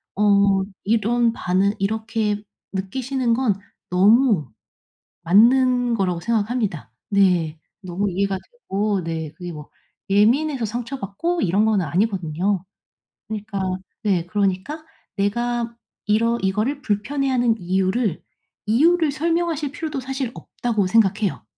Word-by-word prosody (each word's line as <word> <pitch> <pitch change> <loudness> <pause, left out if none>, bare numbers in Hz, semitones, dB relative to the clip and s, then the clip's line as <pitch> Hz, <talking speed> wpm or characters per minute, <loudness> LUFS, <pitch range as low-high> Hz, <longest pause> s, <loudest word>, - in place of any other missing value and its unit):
어 200 -1 +4 0.2
이런 230 +2 +2
반응 190 0 +1
이렇게 215 0 -1 0.3
느끼시는 240 +6 -1
건 230 -5 +1 0.3
너무 205 - +4 0.7
맞는 245 +6 +4
거라고 185 -5 0
생각합니다. 215 - -1 0.2
네 180 -6 +2 0.2
너무 190 +2 -2
이해가 195 +1 0 0.2
되고 205 - -1
네 160 -2 -4
그게 175 +2 -7
뭐 150 -2 -10 0.4
예민해서 245 +7 +3
상처받고 245 - -3
이런 195 +4 +2
건 215 -4 +2
아니거든요. 180 +1 0 0.6
그니까 210 -2 -4 0.4
네 190 -5 +1
그러니까 205 - -1 0.3
내가 235 +3 -1 0.3
이러 230 +3 +2
이거를 215 +9 0
불편해하는 245 +2 0
이유를, 190 +2 0 0.5
'이유를 315 +7 +4
설명하실 325 -1 -1
필요도 305 -3 -4
사실 260 -1 -3
없다.'고 220 -5 -2
생각해요. 205 - +2
210 Hz, 265 characters per minute, -22 LUFS, 190-245 Hz, 0.7 s, 어